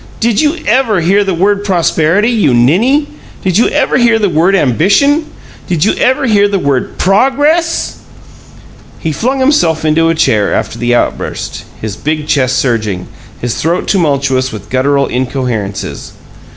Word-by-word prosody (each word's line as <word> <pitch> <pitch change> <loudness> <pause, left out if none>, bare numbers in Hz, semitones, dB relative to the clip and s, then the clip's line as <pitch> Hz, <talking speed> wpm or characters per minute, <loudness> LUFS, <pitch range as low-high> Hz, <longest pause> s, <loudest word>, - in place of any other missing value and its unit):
"Did 230 -2 +1
you 305 +1 +1
ever 225 -3 +2
hear 195 +5 +2
the 190 -3 -2
word 200 +3 +1
Prosperity, 185 +2 +1
you 200 - +2
ninny? 225 - +2 0.4
Did 185 +1 +1
you 235 - +3
ever 280 -3 +1
hear 235 -2 +3
the 210 -3 0
word 170 +4 +2
Ambition? 200 - +2 0.4
Did 170 -2 0
you 215 - +2
ever 260 +2 +1
hear 205 -4 +3
the 200 -1 -1
word 140 -7 -2
PROGRESS?" 290 - +1 1.0
He 160 - -3
flung 255 - -1
himself 175 - +1
into 165 +1 +2
a 165 - +1
chair 110 -10 +1
after 115 - -3
the 120 +1 +1
outburst, - - -3
his 105 -2 -5
big 155 +4 -3
chest 130 -4 +1
surging, 110 -8 -2 0.3
his 120 -1 -3
throat 170 +3 -1
tumultuous 140 -7 0
with 105 -1 -10
gutteral 140 +2 +1
incoherences. 125 -6 -4
170 Hz, 150 wpm, -12 LUFS, 130-225 Hz, 1.0 s, you